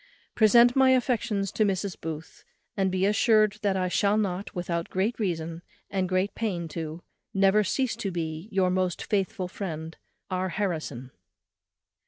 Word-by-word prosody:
_ - - -54
"Present 235 +2 +6
my 265 -1 +5
affections 220 -6 0
to 215 - +1
Mrs. 195 -2 -1
Booth, 160 -1 -7 0.3
and 195 -1 +1
be 185 +1 +1
assured 215 0 +3
that 200 -3 +1
I 185 -1 0
shall 200 +3 +2
not, 200 -1 -2
without 170 -1 -2
great 205 +6 -1
reason, 165 -4 -2 0.3
and 190 -2 0
great 185 +2 +1
pain 185 -7 -2
too, 160 +1 -6 0.4
ever 195 +2 +5
cease 255 +5 0
to 195 - -2
be, 165 +1 -4
Your 190 -2 +2
most 185 -1 0
faithful 195 -2 -1
friend, 165 -4 -6 0.4
"R. 185 0 -1
HARRISON." 155 - -3
190 Hz, 155 wpm, -27 LUFS, 175-210 Hz, 0.4 s, Present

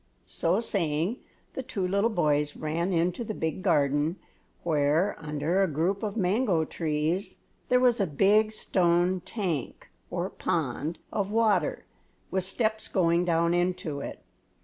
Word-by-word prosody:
So 175 +5 +1
saying 180 -1 0 0.3
the - - -3
two 195 -7 -3
little 200 +4 +2
boys 150 -7 +1
ran 165 +4 -2
into 175 +5 0
the 215 -2 -5
big 160 +3 -2
garden 150 -2 +2 0.5
where, 155 +4 +2
under 155 +4 0
a 195 - +3
group 170 +6 0
of 215 0 -3
mango 190 -3 +2
trees, 160 +5 -2 0.3
there 250 - +5
was 245 -3 +3
a 195 - +1
big 205 +8 +3
stone 180 -3 +1
tank, 175 - -4 0.2
or - - -3
pond, 160 +3 -2 0.2
of 200 -2 -1
water, 220 -1 +1 0.5
with 190 -1 0
steps 220 +2 -1
going 170 -1 +2
down 170 0 +2
into 175 -4 -1
it. - - -7
175 Hz, 140 wpm, -28 LUFS, 160-200 Hz, 0.5 s, there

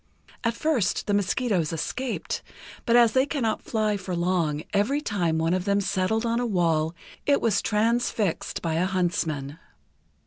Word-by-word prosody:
At 230 -1 0
first 250 - 0
the 205 - 0
mosquitoes 200 -4 +1
escaped, 240 +10 -3 0.5
but, 235 - +4
as 235 -2 +6
they 260 +3 +3
cannot 235 -8 -1
fly 215 -2 0
for 185 -2 -4
long, 170 -4 0
every 215 +8 +2
time 180 - 0
one 165 +2 +1
of 185 0 -1
them 200 0 +2
settled 200 +3 0
on 230 0 +1
the 245 - 0
wall, 165 -5 +1 0.3
it 285 -1 +4
was 215 -4 +2
transfixed 220 -3 0
by 165 -2 0
a 170 +3 +1
huntsman. 165 -6 -1
200 Hz, 160 wpm, -26 LUFS, 170-230 Hz, 0.5 s, as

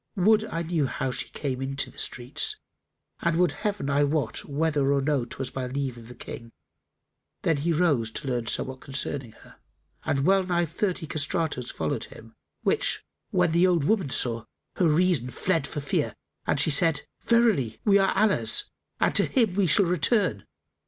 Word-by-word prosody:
Would 215 +3 +4
I 170 -5 -3
knew 160 -4 0
how 130 +1 -2
she - - -3
came 135 -3 -4
into 135 +1 -3
the - - -11
streets 135 - -2 0.6
and 170 -1 0
would 175 -2 +3
Heaven 205 -2 -3
I 145 +1 +2
wot 145 -4 -1
whether 145 -1 +1
or 140 - +3
no 135 -3 0
'twas 130 +1 -6
by 130 -1 -4
leave 135 -1 -3
of 115 -1 -12
the 125 - -11
King!" 115 -1 -9 0.9
Then 165 -3 +2
he 160 +4 0
rose 150 -9 +2
to 145 - -5
learn 120 -3 -1
somewhat 130 +2 -2
concerning 135 -3 -4
her - - -18 0.5
and 135 0 0
well 195 +1 +4
nigh 175 -1 +1
thirty 175 +1 -2
castratos 155 -4 -1
followed 80 -1 -2
him; - - -14 0.3
which - - +1 0.2
when 180 -3 +2
the 170 +3 +4
old 175 -5 +2
woman 195 -2 +1
saw, 115 -3 0 0.3
her 180 - +3
reason 155 -5 +2
fled 165 +1 0
for 145 - -5
fear 140 - -1 0.3
and - - +1
she - - +4
said, 150 0 +2 0.2
"Verily, 225 - +2
we 200 -2 +5
are 195 - +3
Allah's 190 - +3 0.3
and - - +2
to - - +3
Him 230 -8 +2
we 195 -1 +2
shall 190 +5 +5
return! 180 - +1
150 Hz, 180 wpm, -26 LUFS, 135-180 Hz, 0.9 s, we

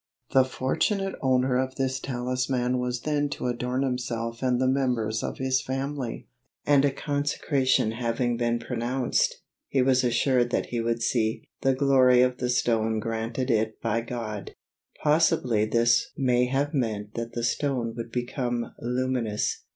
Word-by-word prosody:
The 130 - +6
fortunate 190 - -1
owner 130 -1 +2
of 130 0 -2
this 135 -1 -1
talisman 125 0 -1
was 125 -1 -2
then 145 0 0
to - - -5
adorn 125 +2 -1
himself 115 -3 -3
and 125 -2 +1
the 130 - +2
members 125 -5 0
of - - -4
his 130 0 +1
family, 135 -2 -4 0.4
and, 145 -2 +5
a 145 - +4
consecration 140 -4 0
having 120 +1 -1
been 120 0 0
pronounced, 120 +2 -1 0.2
he 135 -2 +2
was 130 0 +3
assured 120 0 +2
that - - 0
he 120 -1 -1
would 115 0 -1
see 110 -2 0 0.2
"the 135 -1 +2
glory 130 -2 +5
of 125 0 0
the 125 - -2
stone 110 -2 +1
granted 115 +3 -2
it 110 -1 0
by 115 0 0
God." 115 -3 -6 0.5
Possibly 150 -8 +3
this 115 +2 +2
may 125 -2 +3
have 140 +4 0
meant 110 -6 -2
that 115 0 -5
the 120 - -3
stone 120 -2 0
would 115 0 -6
become 120 -1 -2
luminous. 125 -3 -1
125 Hz, 150 wpm, -26 LUFS, 115-130 Hz, 0.5 s, The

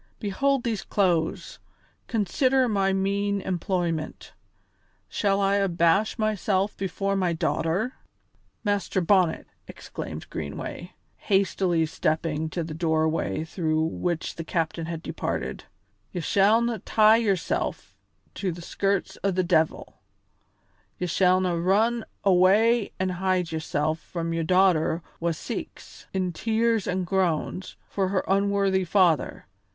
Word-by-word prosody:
Behold 265 +6 0
these 225 -4 -1
clothes, 175 -5 0 0.5
consider 255 +5 +2
my 195 -3 +1
mean 200 +1 0
employment. 175 -4 -3 0.7
Shall 200 -1 0
I 200 0 +2
abash 190 +2 +2
myself 210 -2 0
before 195 +1 -2
my 185 -3 +1
daughter?" 170 +8 -1 0.7
"Master 205 -2 0
Bonnet," 180 -2 +2 0.2
exclaimed - - -8
Greenway, - - -6 0.2
hastily 190 -4 +1
stepping 155 0 -1
to 170 +1 -3
the 160 -1 -6
doorway 160 -1 0
through 160 -1 -1
which 165 +1 -2
the 165 - -4
captain 165 0 -2
had 165 -1 -5
departed, - - -4 0.5
"ye 180 - -4
shallna 220 +6 +2
tie 220 0 +5
yoursel' 200 -6 0 0.6
to 190 -3 -2
the 170 +1 -8
skirts 195 +2 -1
o' 200 - +2
the 185 -1 +1
de'il; 160 -3 0 1.0
ye 180 - -2
shallna 180 -1 +2
run 220 +5 +2 0.2
awa' 200 +4 +4
an' 185 0 0
hide 180 -1 0
yoursel' 155 -1 -1
from 165 +1 -5
your 165 0 -1
daughter 175 -2 +3 0.2
wha 170 - 0
seeks, 160 - -7
in 185 -2 -1
tears 225 +3 +1
an' 185 +1 0
groans, 185 0 -1
for 195 -2 -1
her 185 0 -1
unworthy 195 -1 +2
father. 180 -3 +2
185 Hz, 120 wpm, -26 LUFS, 165-200 Hz, 1.0 s, tie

